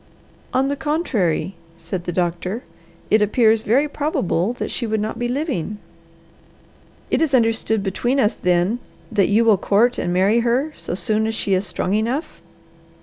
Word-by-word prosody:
"On 265 Hz, +1 st, +2 dB
the 285 Hz, -, -1 dB
contrary," 270 Hz, -, -1 dB, 0.2 s
said 170 Hz, +2 st, -5 dB
the -, -, -2 dB
doctor, 180 Hz, +5 st, -2 dB, 0.5 s
"it 215 Hz, -, +5 dB
appears 220 Hz, +1 st, +3 dB
very 255 Hz, +7 st, +2 dB
probable 245 Hz, -, -1 dB
that 245 Hz, -, -5 dB
she 235 Hz, -, -2 dB
would 220 Hz, 0 st, 0 dB
not 215 Hz, +2 st, -3 dB
be 240 Hz, -, -1 dB
living." 245 Hz, -, -2 dB, 1.3 s
"It -, -, +2 dB
is 295 Hz, -4 st, +3 dB
understood 225 Hz, -3 st, +1 dB
between 240 Hz, +7 st, 0 dB
us, 210 Hz, -4 st, +3 dB
then, 180 Hz, +6 st, +1 dB, 0.3 s
that 205 Hz, -4 st, +2 dB
you 220 Hz, +3 st, +3 dB
will 220 Hz, -3 st, +5 dB
court 230 Hz, +6 st, +2 dB
and 175 Hz, -, -1 dB
marry 195 Hz, +6 st, +3 dB
her 250 Hz, +6 st, 0 dB
so -, -, -4 dB
soon 215 Hz, +3 st, 0 dB
as 220 Hz, -, -2 dB
she 200 Hz, -, 0 dB
is 190 Hz, +2 st, +1 dB
strong 185 Hz, +1 st, -2 dB
enough?" 235 Hz, +9 st, -2 dB
220 Hz, 165 wpm, -21 LUFS, 195-245 Hz, 1.3 s, it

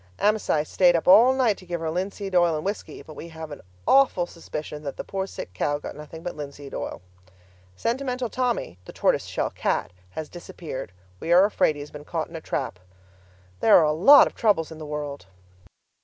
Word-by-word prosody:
Amasai 205 Hz, -7 st, +2 dB
stayed 175 Hz, +2 st, +3 dB
up 165 Hz, -, -1 dB
all 230 Hz, +7 st, +8 dB
night 255 Hz, -6 st, +2 dB
to 185 Hz, -, -14 dB
give 175 Hz, -1 st, -3 dB
her 160 Hz, -1 st, -2 dB
linseed 195 Hz, +2 st, -4 dB
oil 175 Hz, -2 st, +4 dB
and 155 Hz, -, -4 dB
whisky. 205 Hz, +2 st, -5 dB
But 155 Hz, -, -11 dB
we 170 Hz, -, -8 dB
have 160 Hz, -2 st, -9 dB
an 145 Hz, -, -8 dB, 0.3 s
awful 265 Hz, -10 st, +4 dB
suspicion 155 Hz, -3 st, -7 dB
that 140 Hz, -2 st, -6 dB
the -, -, -4 dB
poor 195 Hz, 0 st, -3 dB
sick 90 Hz, -, -8 dB
cow 145 Hz, +10 st, 0 dB
got -, -, -8 dB
nothing 150 Hz, +2 st, -10 dB
but 175 Hz, -, -4 dB
linseed 145 Hz, -1 st, -8 dB
oil. -, -, -5 dB, 0.7 s
Sentimental 250 Hz, -, -2 dB
Tommy 240 Hz, -, -2 dB
(the -, -, -10 dB
tortoise -, -, +1 dB
shell -, -, -2 dB
cat) -, -, -1 dB, 0.2 s
has 155 Hz, +11 st, -6 dB
disappeared; 165 Hz, -, -8 dB, 0.3 s
we 165 Hz, -, -3 dB
are 180 Hz, +3 st, +7 dB
afraid 200 Hz, -6 st, +2 dB
he 145 Hz, -, -7 dB
has 145 Hz, -, -9 dB
been 150 Hz, -1 st, -9 dB
caught 160 Hz, +1 st, -3 dB
in 165 Hz, -, -11 dB
a 160 Hz, -, -5 dB
trap. 130 Hz, -13 st, -3 dB, 0.8 s
There 215 Hz, -, +7 dB
are 155 Hz, -3 st, +4 dB
lots 215 Hz, -, +8 dB
of -, -, -5 dB
troubles 200 Hz, -9 st, +1 dB
in 160 Hz, -, -9 dB
the 155 Hz, -, -7 dB
world! 145 Hz, -4 st, -5 dB
165 Hz, 200 wpm, -25 LUFS, 150-200 Hz, 0.8 s, all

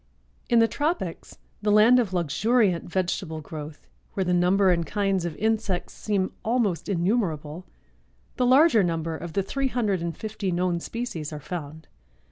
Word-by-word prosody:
In 235 Hz, -, +4 dB
the 230 Hz, 0 st, +6 dB
tropics, 290 Hz, -, -3 dB, 0.2 s
the 210 Hz, 0 st, +1 dB
land 220 Hz, +4 st, +6 dB
of 225 Hz, -6 st, 0 dB
luxuriant 185 Hz, -, +1 dB
vegetable 175 Hz, -3 st, -2 dB
growth, 150 Hz, 0 st, -9 dB, 0.3 s
where 195 Hz, -, +1 dB
the 180 Hz, -1 st, 0 dB
number 185 Hz, +2 st, +4 dB
and 170 Hz, -1 st, +1 dB
kinds 195 Hz, -1 st, -1 dB
of 165 Hz, -3 st, -4 dB
insects 215 Hz, -4 st, -1 dB
seem 200 Hz, -3 st, -1 dB
almost 220 Hz, -7 st, 0 dB
innumerable, 175 Hz, -4 st, -1 dB, 0.7 s
the 250 Hz, -2 st, +2 dB
larger 265 Hz, -2 st, +6 dB
number 165 Hz, -2 st, -2 dB
of 170 Hz, 0 st, -7 dB
the 195 Hz, -, +1 dB
three 275 Hz, +7 st, -1 dB
hundred 215 Hz, -8 st, 0 dB
and 170 Hz, -2 st, -4 dB
fifty 210 Hz, -3 st, -3 dB
known 175 Hz, 0 st, 0 dB
species 170 Hz, -8 st, -5 dB
are 150 Hz, -, -6 dB
found. 155 Hz, 0 st, -7 dB
185 Hz, 155 wpm, -25 LUFS, 170-220 Hz, 0.7 s, the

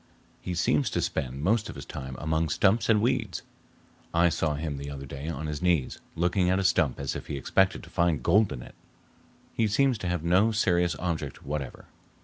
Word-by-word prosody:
"He 90 Hz, -, -4 dB
seems 75 Hz, -3 st, +2 dB
to -, -, -1 dB
spend 65 Hz, +2 st, -3 dB
most 110 Hz, +4 st, +1 dB
of -, -, -7 dB
his 70 Hz, -, -8 dB
time 65 Hz, -1 st, -7 dB
among 80 Hz, +2 st, 0 dB
stumps 100 Hz, +9 st, +2 dB
and 105 Hz, -2 st, +4 dB
weeds. 120 Hz, -7 st, 0 dB, 0.7 s
I 85 Hz, +1 st, +5 dB
saw 80 Hz, -2 st, 0 dB
him 75 Hz, -1 st, -3 dB
the 70 Hz, +1 st, -6 dB
other 70 Hz, -1 st, -7 dB
day 70 Hz, +3 st, -6 dB
on 80 Hz, -1 st, -4 dB
his 75 Hz, -1 st, -4 dB
knees, 85 Hz, -7 st, +1 dB, 0.2 s
looking 90 Hz, +2 st, +1 dB
at 95 Hz, -, +3 dB
a 95 Hz, -, 0 dB
stump 80 Hz, -7 st, +2 dB
as 70 Hz, -1 st, -3 dB
if -, -, -6 dB
he 70 Hz, -, -3 dB
expected 95 Hz, +8 st, +1 dB
to -, -, -12 dB
find 85 Hz, -7 st, +1 dB
gold 105 Hz, 0 st, +4 dB
in -, -, -6 dB
it. -, -, -13 dB, 0.8 s
He 115 Hz, -, +1 dB
seems 125 Hz, +2 st, +2 dB
to 90 Hz, -, -3 dB
have 90 Hz, -2 st, -1 dB
no 95 Hz, +6 st, +4 dB
serious 90 Hz, -6 st, +2 dB
object 80 Hz, -4 st, -4 dB
whatever." 70 Hz, -2 st, -5 dB
85 Hz, 205 wpm, -27 LUFS, 70-95 Hz, 0.8 s, I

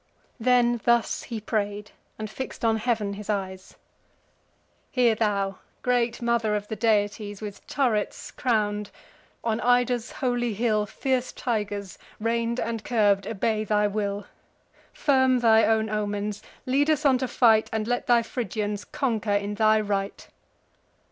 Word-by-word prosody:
Then 240 Hz, -1 st, +3 dB
thus 235 Hz, -1 st, +2 dB
he 230 Hz, -2 st, -5 dB
pray'd, 210 Hz, -1 st, -3 dB, 0.3 s
and 215 Hz, -, -4 dB
fix'd 250 Hz, +2 st, -6 dB
on 225 Hz, -1 st, +3 dB
heav'n 220 Hz, -3 st, -1 dB
his 210 Hz, +1 st, -9 dB
eyes: 190 Hz, -2 st, -4 dB, 1.2 s
"Hear 245 Hz, -3 st, +4 dB
thou, 200 Hz, -3 st, -1 dB, 0.2 s
great 245 Hz, -1 st, +1 dB
Mother 235 Hz, -3 st, +1 dB
of 205 Hz, 0 st, -3 dB
the 220 Hz, -, -3 dB
deities. 205 Hz, -2 st, 0 dB
With 210 Hz, -2 st, -8 dB
turrets 240 Hz, -7 st, -1 dB
crown'd! 210 Hz, -4 st, 0 dB, 0.5 s
(on 225 Hz, -1 st, 0 dB
Ida's 245 Hz, -1 st, +1 dB
holy 240 Hz, -3 st, -1 dB
hill 215 Hz, -1 st, +1 dB
Fierce 255 Hz, +3 st, -1 dB
tigers, 205 Hz, -5 st, -3 dB, 0.2 s
rein'd 230 Hz, +2 st, 0 dB
and 225 Hz, -1 st, -3 dB
curb'd, 205 Hz, -4 st, +2 dB
obey 220 Hz, 0 st, 0 dB
thy 210 Hz, 0 st, +2 dB
will.) 205 Hz, -1 st, -2 dB, 0.7 s
Firm 260 Hz, -3 st, +3 dB
thy 225 Hz, -2 st, +5 dB
own 220 Hz, 0 st, +2 dB
omens; 210 Hz, -1 st, -2 dB, 0.2 s
lead 280 Hz, +4 st, +2 dB
us 305 Hz, -2 st, +1 dB
on 265 Hz, -3 st, +4 dB
to 260 Hz, -, -1 dB
fight; 225 Hz, -3 st, +4 dB
And 220 Hz, -1 st, -2 dB
let 245 Hz, 0 st, -1 dB
thy 235 Hz, -1 st, +4 dB
Phrygians 210 Hz, -3 st, -3 dB
conquer 225 Hz, -6 st, -2 dB
in 205 Hz, 0 st, 0 dB
thy 215 Hz, +1 st, +4 dB
right." 200 Hz, -1 st, -3 dB
220 Hz, 140 wpm, -26 LUFS, 205-240 Hz, 1.2 s, thy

